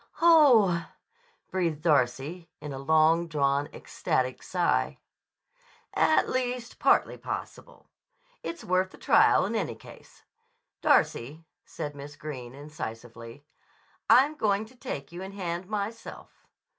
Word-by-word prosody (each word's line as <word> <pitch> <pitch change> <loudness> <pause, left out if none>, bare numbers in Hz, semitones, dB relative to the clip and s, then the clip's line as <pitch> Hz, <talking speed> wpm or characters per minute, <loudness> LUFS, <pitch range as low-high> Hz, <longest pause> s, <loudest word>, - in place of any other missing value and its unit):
"Oh 295 - +6
h 170 - 0
h - - -9
h!" - - -19 0.6
breathed 170 -5 -1
Darcy 145 +3 0
in 150 -2 -7
a 135 - -6
long 160 +4 +3
drawn, 140 -2 0
ecstatic 130 -1 -2
sigh. 180 -2 0 1.0
"At 315 - +3
least 250 -2 -3
partly - - +3
possible. - - -7 0.6
It's 335 - -6
worth 185 +1 +1
the - - -15
trial, - - +4
in - - -3
any - - -2
case. - - -16 0.6
Darcy," 150 +7 +1 0.2
said 150 -3 -6
Miss 145 +1 -10
Greene 130 -5 -8
incisively, 120 -3 -9 0.6
"I'm 275 +4 +6
going 215 -7 0
to 245 +4 -18
take 205 - -6
you 175 +1 -8
in 190 +1 -7
hand, 180 -2 -4
myself." 215 +2 -6
170 Hz, 130 wpm, -27 LUFS, 140-205 Hz, 1.0 s, Oh